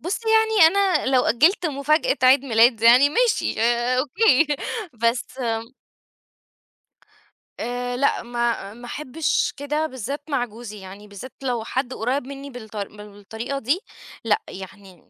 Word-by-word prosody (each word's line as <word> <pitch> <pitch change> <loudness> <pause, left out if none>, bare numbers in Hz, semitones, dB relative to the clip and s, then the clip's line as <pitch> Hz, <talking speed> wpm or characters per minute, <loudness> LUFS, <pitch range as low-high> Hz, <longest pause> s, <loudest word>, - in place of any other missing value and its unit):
بُصّي 390 +7 -4
يعني 440 -5 +5
أنا 385 -6 +1
لو 260 -1 +3
أجّلت 330 - +3
مفاجأة 305 - +1
عيد 260 +2 +5
ميلاد 230 -1 +3
يعني 250 +5 +7
ماشي 460 - 0
آآ 240 +2 +1
أوكي، 305 - +3 0.6
بس 235 +2 -1
آمم 230 0 -3 1.9
آآ 245 +1 -3
لأ 280 - +1
ما 235 -4 -2
ما 240 +2 -12
أحبّش 300 +4 -2
كده 295 +2 -2
بالذات 260 +2 -6
مع 260 -4 0
جوزي، 220 -2 -10
يعني 195 +2 -11
بالذات 205 +5 -10
لو 245 -4 -2
حد 260 +2 -3
قريّب 255 +5 -2
مني 280 0 -8
بالط 225 -4 -11
بالطريقة 210 +5 -7
دي، 275 +9 0 0.4
لأ 440 - +1
يعني 190 0 -11
250 Hz, 135 wpm, -22 LUFS, 230-285 Hz, 1.9 s, يعني